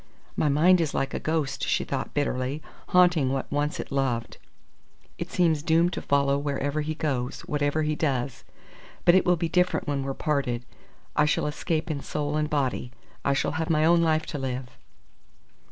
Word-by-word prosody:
"My 150 - +2
mind 170 +5 +5
is 155 -4 -1
like 135 0 -1
a - - -2
ghost," 155 -3 -1
she - - +1
thought, - - -4
bitterly, 140 0 -1 0.2
"haunting 175 -7 +4
what 135 -1 -3
once 145 +1 -1
it - - -6
loved. 130 -4 -1 0.8
It - - -4
seems 165 -4 +2
doomed 165 +2 +3
to - - -3
follow 140 0 +2
wherever 145 +1 -1
he 155 +1 -3
goes, 135 -5 -2
whatever 145 +1 0
he 155 0 0
does. 130 -5 -1 0.6
But 175 - +7
it 185 - +4
will 180 - +5
be 170 0 -1
different 180 0 +1
when 140 -1 0
we're 135 0 -3
parted. 125 -5 -1 0.5
I 150 - +4
shall 150 - +1
escape 155 +2 -2
in 140 -2 -3
soul 150 +1 -3
and 150 0 0
body. 135 -5 -1 0.3
I 140 - +2
shall - - 0
have 160 - -2
my 155 -1 +3
own 170 +1 +5
life 160 -1 +2
to 145 - -5
live." 130 -1 -4
150 Hz, 185 wpm, -26 LUFS, 135-160 Hz, 0.8 s, But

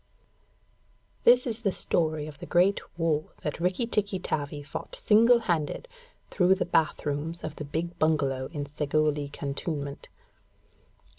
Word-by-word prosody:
_) - - -35
This 245 +1 +7
is 230 -2 -3
the 200 -4 +1
story 155 -4 0
of 150 -2 -10
the - - -8
great 185 +3 +3 0.2
war 160 -2 +1 0.2
that 150 - -3
Rikki 180 +7 0
tikki 205 -4 0
tavi 145 -4 -3
fought 155 - -7
single 235 - +5
handed, 170 - -1 0.4
through 185 0 +4
the 195 - -1
bath 165 -2 +1
rooms 150 +4 -3
of 155 0 -5
the 150 - -5
big 170 +4 -4
bungalow 140 -4 +1
in 145 -3 -4
Segowlee 150 0 0
cantonment. 140 0 -4
160 Hz, 145 wpm, -28 LUFS, 145-190 Hz, 0.4 s, This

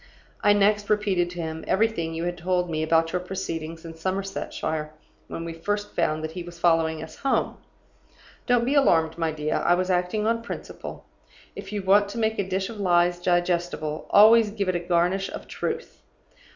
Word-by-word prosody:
I 205 - +5
next 205 0 +2
repeated 200 -4 +1
to 175 -1 -6
him 160 0 -5
everything 190 -6 0
you 165 - -3
had 175 0 -2
told 180 0 -1
me 155 -1 -1
about 165 +1 +2
your 180 - +1
proceedings 165 -3 -5
in 165 - -7
Somersetshire, 165 -3 -3 0.4
when 165 - -6
we 165 - -5
first 205 +5 -3
found 155 +1 0
that 160 - -4
he 180 - -6
was 175 0 -10
following 165 -2 +2
us 160 0 -11
home. 275 - 0 0.9
Don't 245 -2 +3
be 265 - +1
alarmed 165 - +3
my 165 -1 0
dear 155 0 -2
I 175 - +3
was 185 +1 0
acting 180 +4 0
on 230 +1 +1
principle. 235 - -8 0.5
If 200 0 -8
you 205 -2 -3
want 200 +2 +4
to 220 - -7
make 220 -1 0
a 190 -1 -1
dish 190 0 -1
of 225 -2 -9
lies 175 -2 +3
digestible, 175 -3 -1
always 220 +1 +7
give 205 -2 -3
it 185 - +1
a - - +1
garnish 175 +2 +1
of - - -8
truth. 465 +1 -5
180 Hz, 190 wpm, -25 LUFS, 165-205 Hz, 0.9 s, always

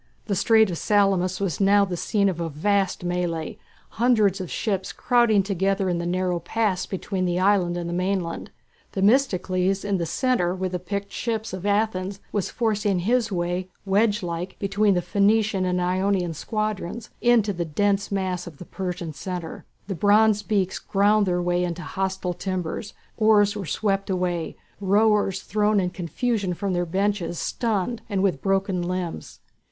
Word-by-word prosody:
The 200 - -1
strait 220 0 +4
of 170 - -4
Salamis 195 -3 +2
was 195 -3 -2
now 200 +1 +5
the 185 -2 -4
scene 200 +3 +1
of 180 -3 -1
a 165 -1 -2
vast 190 +4 0
mêlée, 175 -2 -2 0.4
hundreds 215 -6 +3
of 180 - -6
ships 195 -4 -2
crowding 235 -5 +3
together 195 0 0
in 175 -1 0
the 170 - -3
narrow 180 0 0
pass 195 +2 -1
between 190 -1 -3
the 175 0 0
island 185 -3 +2
and 170 -1 -3
the 170 - -3
mainland. 180 -1 -2 0.4
Themistocles 195 -4 +2
in 200 -2 0
the 170 - -2
centre 190 -4 +1
with 185 -1 -3
the 180 - -2
picked 200 +2 -4
ships 225 -3 -3
of 190 +2 -4
Athens 200 -2 0
was 205 -3 -1
forcing 210 -5 0
his 230 +3 +1
way, 180 0 -2 0.2
wedge 205 +1 +2
like, 175 +2 -4
between 200 0 +2
the 175 - 0
Phoenician 205 -1 +2
and 180 0 0
Ionian 180 -1 0
squadrons 215 +4 -4
into 230 -4 +3
the 175 -1 -2
dense 200 +6 0
mass 185 -2 -2
of 160 -5 -10
the 180 - -10
Persian 180 -4 -5
centre. 175 0 -6 0.2
The 195 - -3
bronze 210 +3 +4
beaks 195 -3 -1
ground 205 +1 +2
their 180 -1 0
way 175 0 +1
into 175 0 -3
hostile 190 -1 -2
timbers, 185 +2 -4 0.2
oars 210 -2 +4
were 195 -5 -5
swept 195 +4 -1
away, 180 -3 -2 0.2
rowers 205 0 +2
thrown 210 +1 +2
in 180 -2 -1
confusion 190 - -2
from 195 +1 -2
their 175 0 0
benches 190 -1 -1
stunned 225 +2 -1
and 195 -2 0
with 180 -8 +1
broken 195 -1 0
limbs. 180 -1 -4
195 Hz, 165 wpm, -24 LUFS, 180-205 Hz, 0.4 s, now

